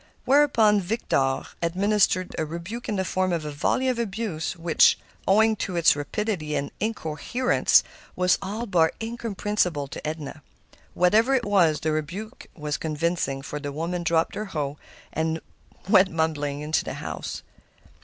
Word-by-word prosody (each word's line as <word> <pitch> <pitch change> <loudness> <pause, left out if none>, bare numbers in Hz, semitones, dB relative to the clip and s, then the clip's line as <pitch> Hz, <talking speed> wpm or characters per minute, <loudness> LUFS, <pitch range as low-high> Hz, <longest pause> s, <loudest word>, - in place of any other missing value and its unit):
Whereupon 235 -7 +4
Victor 155 - 0 0.2
administered 185 +1 +1
a - - +1
rebuke 170 +10 -6
in 210 - 0
the 190 -1 -1
form 185 0 0
of 165 -3 -1
a 150 - -4
volley 205 - 0
of 250 -2 0
abuse, 200 -7 -3
which, 170 -1 +4 0.3
owing 220 +3 +5
to 185 -2 -3
its 170 -3 +5
rapidity 155 +1 -2
and 140 - -2
incoherence, 220 +4 +2 0.3
was 180 0 +3
all 210 +5 -4
but 170 -6 +2
incomprehensible 210 -9 -1
to 150 - -6
Edna. 155 -1 -5 0.5
Whatever 220 +9 +4
it 250 - 0
was, 175 -7 +3
the 155 - 0
rebuke 180 - -5
was 150 -2 -3
convincing, 155 -3 -1
for 150 +1 -5
the 145 -1 -5
woman 170 +4 -3
dropped 165 -1 +1
her 215 - -4
hoe 145 -6 -4 0.3
and 160 +1 -1 0.5
went 195 -2 +6
mumbling 150 -3 -1
into 155 +1 0
the - - -5
house. - - -6
175 Hz, 150 wpm, -25 LUFS, 155-210 Hz, 0.5 s, went